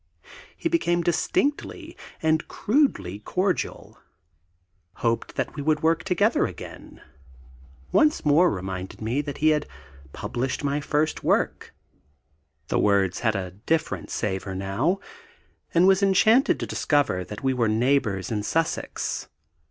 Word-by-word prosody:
He - - -1
became 175 - +1
distinctly 275 - -1 0.3
and 160 -1 +2
crudely 210 - 0
cordial 185 - -2 1.0
hoped 115 -1 -1
that - - -2
we 145 - -4
should 155 +1 +1
work 160 0 +2
together 180 +1 +2
again; - - -11 0.9
once 305 - +3
more 155 +5 +5
reminded 95 -1 -5
me 115 +6 -1
that 145 -2 -6
he 155 - +3
had 150 -1 +1 0.4
published 125 - -3
my 140 +1 0
first 150 +2 0
book - - 0 1.0
(the - - +1
words 100 -3 +2
had 110 -2 +1
a 95 -2 -3
different 120 - -2
savour 95 -2 -3
now), 100 - 0 0.7
and 175 +2 +4
was 190 +1 +5
enchanted 215 +6 +4
to - - -2
discover 145 -11 +1
that 105 +6 -9
we 135 -1 +2
were 120 -3 +1
neighbours 110 -4 +1
in 105 -2 -1
Sussex. 165 +10 -2
145 Hz, 130 wpm, -25 LUFS, 105-170 Hz, 1.0 s, more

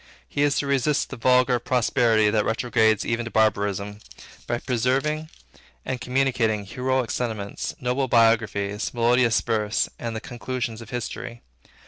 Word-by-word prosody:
He 145 - -3
is 145 -1 +2
to - - 0
resist 140 +1 +1
the - - -4
vulgar 125 0 +3
prosperity 115 -3 +2
that 105 -1 +2
retrogrades 110 -2 +1
ever 115 +1 -1
to 120 - -6
barbarism, 105 -2 0 0.5
by 120 - 0
preserving 135 +6 -1 0.6
and 130 -2 -3
communicating 125 -5 0
heroic 130 +2 -1
sentiments, 110 -5 -3
noble 125 +2 0
biographies, 115 -3 +1
melodious 120 0 +3
verse, 110 0 0
and 115 -1 -4
the - - -2
conclusions 120 -1 -5
of 115 - -11
history. 120 0 -6
120 Hz, 135 wpm, -24 LUFS, 110-130 Hz, 0.6 s, vulgar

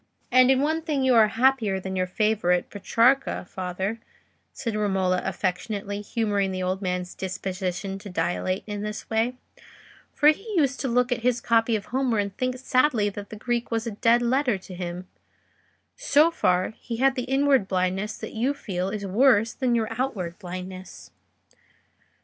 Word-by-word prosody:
'" - - -48
"And 255 +1 +6
in 265 0 +4
one 315 +3 0
thing 300 -4 -1
you 260 -1 +4
are 225 -2 +6
happier 225 -3 +2
than 190 0 -5
your 185 0 0
favourite 185 -3 +1
Petrarca, 235 +4 +2
father," 190 +3 -4 0.5
said 230 -5 -4
Romola, 190 -3 +1
affectionately 200 +2 -3
humouring 205 -3 -1
the 185 0 -3
old 185 +2 -1
man's 180 -1 -3
disposition 190 +1 -4
to 200 - -9
dilate 185 +1 -1
in 205 -1 -5
this 210 0 -5
way; 225 +3 +1 0.8
"for 295 - +5
he 400 +7 -1
used 275 -4 +2
to 270 - -2
look 250 +1 +1
at 245 - +1
his 245 0 +1
copy 230 -1 +2
of 205 - -3
Homer 260 -4 +1
and 200 -1 -2
think 255 0 -2
sadly 255 -4 +2
that 200 0 -8
the - - -8
Greek 240 +2 -2
was 230 0 -1
a 230 - -3
dead 230 +3 +3
letter 250 -2 +1
to 185 0 -12
him: 180 0 -6 0.9
so 335 -10 +4
far, 180 - +1
he 230 -2 -5
had 270 +2 +3
the 250 -2 -3
inward 270 -4 +2
blindness 190 +3 -1
that - - -7
you 250 +6 0
feel 185 -8 -3
is 200 0 -4
worse 225 +2 +3
than 250 -2 0
your 225 -2 +1
outward 185 -10 -3
blindness." 185 - -8
215 Hz, 175 wpm, -25 LUFS, 190-250 Hz, 0.9 s, And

